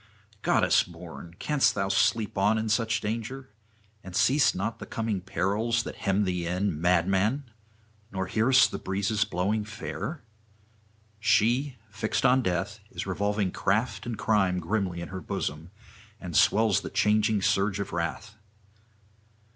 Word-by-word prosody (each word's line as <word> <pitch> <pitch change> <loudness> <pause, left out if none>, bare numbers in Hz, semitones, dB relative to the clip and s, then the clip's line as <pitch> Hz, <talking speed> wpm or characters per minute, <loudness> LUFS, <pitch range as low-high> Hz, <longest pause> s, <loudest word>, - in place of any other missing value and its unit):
'Goddess - - +3
born, 85 -1 -10
canst 150 -2 +2
thou 100 -1 0
sleep 105 +2 +1
on 105 +3 +3
in 110 0 -2
such 115 0 +1
danger? 115 +5 -4 0.5
and 95 -1 -9
seest 130 +7 +4
not 105 +5 -3
the - - -8
coming 110 -4 -2
perils 105 +7 0
that - - -7
hem 100 0 +1
thee 90 -3 -2
in, 90 -2 -1
madman! 95 - +1 0.6
nor 95 -1 -2
hearest 115 +7 +4
the - - -4
breezes 100 +3 0
blowing 105 +2 -1
fair? 115 +7 -6 1.0
She, 120 +6 +2 0.2
fixed 110 +2 -1
on 130 +1 +5
death, 95 +1 -2
is 90 - -5
revolving 100 0 -1
craft 110 +7 -1
and 115 -3 -3
crime 100 -4 +2
grimly 90 -1 -2
in 85 - -6
her 95 -1 -6
bosom, 75 +1 -4 0.5
and 90 -3 -7
swells 110 -2 +4
the - - -6
changing 105 -1 +2
surge 100 +1 +1
of 100 - -4
wrath. 85 +5 -3
105 Hz, 140 wpm, -27 LUFS, 95-110 Hz, 1.0 s, on